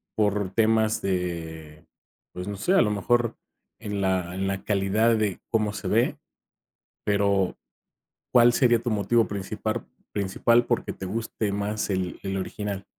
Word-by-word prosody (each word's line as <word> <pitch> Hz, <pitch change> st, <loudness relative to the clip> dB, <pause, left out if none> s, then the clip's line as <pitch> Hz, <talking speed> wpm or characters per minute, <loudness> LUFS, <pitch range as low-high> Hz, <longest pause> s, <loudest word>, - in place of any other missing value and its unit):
por 105 Hz, -2 st, +1 dB
temas 110 Hz, 0 st, +2 dB
de, 80 Hz, -4 st, -4 dB, 0.5 s
pues, 90 Hz, +1 st, -6 dB
no 100 Hz, -1 st, -4 dB
sé, 180 Hz, -, +1 dB
a 195 Hz, -, +6 dB
lo 105 Hz, -, 0 dB
mejor 115 Hz, +3 st, +1 dB, 0.4 s
en 105 Hz, -1 st, -4 dB
la 95 Hz, -2 st, 0 dB
en 95 Hz, 0 st, -1 dB
la 95 Hz, 0 st, -2 dB
calidad 105 Hz, +3 st, +2 dB
de 105 Hz, -4 st, 0 dB
cómo 110 Hz, -3 st, +1 dB
se -, -, -5 dB
ve, -, -, +2 dB, 0.9 s
pero, 100 Hz, -2 st, +2 dB, 0.8 s
¿cuál 120 Hz, -1 st, +7 dB
sería 120 Hz, -3 st, +4 dB
tu 120 Hz, -, -1 dB
motivo 110 Hz, +1 st, +2 dB
principar 105 Hz, +3 st, -3 dB, 0.3 s
principal, 115 Hz, +4 st, +2 dB
porque, -, -, -1 dB
te 95 Hz, -, -7 dB
guste 110 Hz, 0 st, -2 dB
más 105 Hz, +1 st, -2 dB
el 95 Hz, -2 st, -2 dB
el 95 Hz, 0 st, -2 dB
original? 100 Hz, +1 st, -4 dB
100 Hz, 150 wpm, -26 LUFS, 95-110 Hz, 0.9 s, cuál